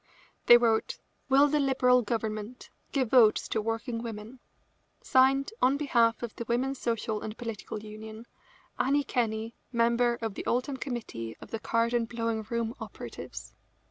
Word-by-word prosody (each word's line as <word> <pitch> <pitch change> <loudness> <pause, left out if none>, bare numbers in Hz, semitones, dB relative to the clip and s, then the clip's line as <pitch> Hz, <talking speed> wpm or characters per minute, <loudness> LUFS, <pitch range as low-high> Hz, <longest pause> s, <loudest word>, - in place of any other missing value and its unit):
They 240 - +10
wrote: 230 -2 +1 0.3
"Will 275 +2 +6
the 300 +1 +1
Liberal 255 -2 +4
Government 220 +1 -4 0.2
give 260 -5 0
votes 230 -5 +5
to 220 - 0
working 230 +2 -3
women? 225 +2 -7 0.6
Signed, 270 +6 +3
on 265 +2 +4
behalf 235 -6 +2
of 235 - -5
the 235 - -4
Women's 255 +3 -1
Social 220 -2 -2
and 215 0 -6
Political 220 -2 -6
Union, 220 +1 -9 0.5
Annie 285 +2 +2
Kenney, 225 -3 -1 0.2
member 235 0 +2
of 225 -3 -3
the - - -7
Oldham 255 +3 0
committee 225 - -5
of - - -12
the 225 - -3
card 230 +1 0
and 235 -1 0
blowing 230 -1 -2
room 235 -1 -1
operatives." - - -8
235 Hz, 150 wpm, -29 LUFS, 220-255 Hz, 0.6 s, They